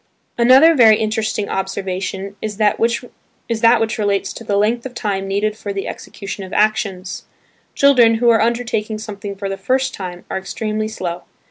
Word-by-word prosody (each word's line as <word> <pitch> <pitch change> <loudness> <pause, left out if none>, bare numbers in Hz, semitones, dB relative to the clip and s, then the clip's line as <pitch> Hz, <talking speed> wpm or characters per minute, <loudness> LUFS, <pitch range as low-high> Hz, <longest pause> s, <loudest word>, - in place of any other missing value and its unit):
Another 260 +7 +6
very 225 -7 +6
interesting 215 -1 -1
observation 190 0 -4
is 210 -2 -4
that 210 -1 +2
which 235 +2 0 0.9
relates 200 -2 0
to - - -9
the 205 -2 0
length 225 +3 +1
of 260 -2 -8
time 195 -4 -2
needed 205 +2 -1
for 205 -1 -6
the 195 -1 -4
execution 200 0 -7
of 190 - -9
actions. 205 -3 -1 0.5
Children, 250 -5 +5
who 235 +1 +4
are 225 - +3
undertaking 225 -2 -1
something 205 -2 -7
for 195 0 -5
the 195 0 -4
first 260 +6 0
time 180 -2 -7
are 190 - -3
extremely 215 +2 -3
slow. 180 -5 -5
215 Hz, 160 wpm, -18 LUFS, 195-230 Hz, 0.9 s, Another